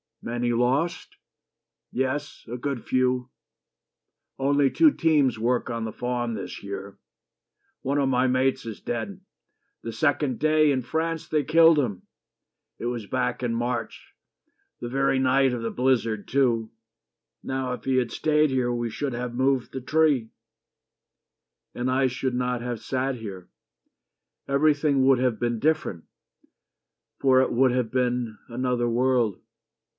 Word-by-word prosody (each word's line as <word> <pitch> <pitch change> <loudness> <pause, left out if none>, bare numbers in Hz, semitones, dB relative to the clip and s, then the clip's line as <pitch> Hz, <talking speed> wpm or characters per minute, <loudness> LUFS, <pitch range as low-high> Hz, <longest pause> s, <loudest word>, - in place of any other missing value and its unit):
"Many 120 +1 -1
lost?" 130 +8 0 0.7
"Yes: 135 +2 -3
good 135 -3 -3
few. 130 0 +1 1.1
Only 140 +1 +3
two 315 - +5
teams 150 - +2
work 120 +2 0
on 115 -1 -3
the 110 - -3
farm 120 0 -2
this 100 - -7
year. 100 0 -7 0.8
One 140 +2 -1
of 140 -1 +2
my 130 0 +2
mates 130 0 +1
is 110 -3 -6
dead. 185 - -4 0.6
The 115 - -5
second 140 +1 0
day 155 -1 +4
In 130 -2 0
France 160 +5 -2
they 150 -2 +1
killed 160 +1 +6
him. 105 -9 -2 0.7
It - - -6
was 120 -3 -3
back 125 +1 -1
in 120 -2 -1
March, 120 -1 -4 0.7
The 120 - -5
very 135 +1 +1
night 130 0 +3
of 120 -2 -4
the 115 - -2
blizzard, 115 -5 0
too. 120 -4 +1 0.7
Now 130 -1 -2
if - - -7
He 130 -1 +1
had 125 -2 0
stayed 150 -1 +2
here 125 -2 +1
we 120 -1 -2
should 140 +1 -3
have 120 0 -4
moved 130 0 +1
the 130 - -5
tree." 145 -4 +2 1.4
"And 125 +1 -2
I 130 +1 +2
should 130 0 -2
not 125 -1 -1
have 120 -2 -4
sat 130 0 -2
here. 100 -6 -8 1.0
Everything 145 -1 +2
Would 135 -1 +5
have 125 -3 0
been 120 -1 0
different. 150 - 0 1.1
For 130 -1 +5
it 130 - 0
would 130 +1 +3
have 125 -3 -1
been 125 -3 -1
Another 120 0 -1
world." 120 -4 +1
125 Hz, 140 wpm, -25 LUFS, 120-135 Hz, 1.4 s, killed